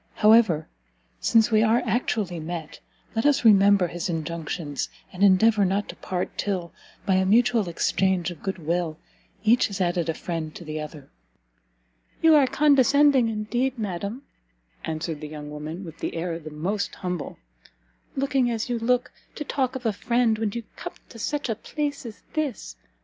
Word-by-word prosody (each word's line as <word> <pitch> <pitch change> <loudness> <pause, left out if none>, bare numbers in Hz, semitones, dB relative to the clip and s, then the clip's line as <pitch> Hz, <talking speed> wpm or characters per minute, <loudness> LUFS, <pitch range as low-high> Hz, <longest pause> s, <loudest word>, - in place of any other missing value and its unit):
However, 215 -8 +5 0.5
since 225 0 +3
we 215 -1 +5
are 225 +2 +3
actually 215 -6 -1
met, 160 0 -6 0.4
let 225 - +1
us 290 -4 +3
remember 200 -2 +6
his 175 +3 -4
injunctions, 160 -2 -3 0.2
and 180 - -8
endeavour 205 +2 +5
not 195 +2 0
to - - -7
part 180 -1 -4
till, 180 -5 -2 0.3
by 195 - +2
a 190 - +2
mutual 225 -2 +3
exchange 180 +1 +1
of 165 - -11
good 195 -1 -3
will, 165 -1 -2 0.5
each 230 +3 +4
has 200 -1 -6
added 175 -2 0
a 160 - 0
friend 165 -3 -4
to 170 - -9
the 155 0 -4
other." 150 -2 -9 1.1
"You 325 -1 +6
are 290 -3 +6
condescending, 280 -3 +4
indeed, 240 +5 -1
madam," 205 +4 -4 0.6
answered 160 -1 -4
the 150 - -5
young 150 -1 -8
woman, 155 +5 -6
with 165 -1 -11
an - - -2
air 165 0 -3
the 155 -1 -9
most 180 +7 -3
humble, 180 -4 -4 0.8
"looking 270 -2 +1
as 230 0 -2
you 240 -1 -1
look, 250 +2 +1 0.2
to 300 - -4
talk 265 -2 -1
of 255 -2 -6
a 220 - +2
friend 230 +1 +1
when 220 -2 0
you 235 - -4
come - - -6 0.2
to 230 - -12
such 290 +5 -2
a 225 - 0
place 285 +4 -4
as 220 - -11
this! 275 - -3
200 Hz, 170 wpm, -25 LUFS, 170-240 Hz, 1.1 s, remember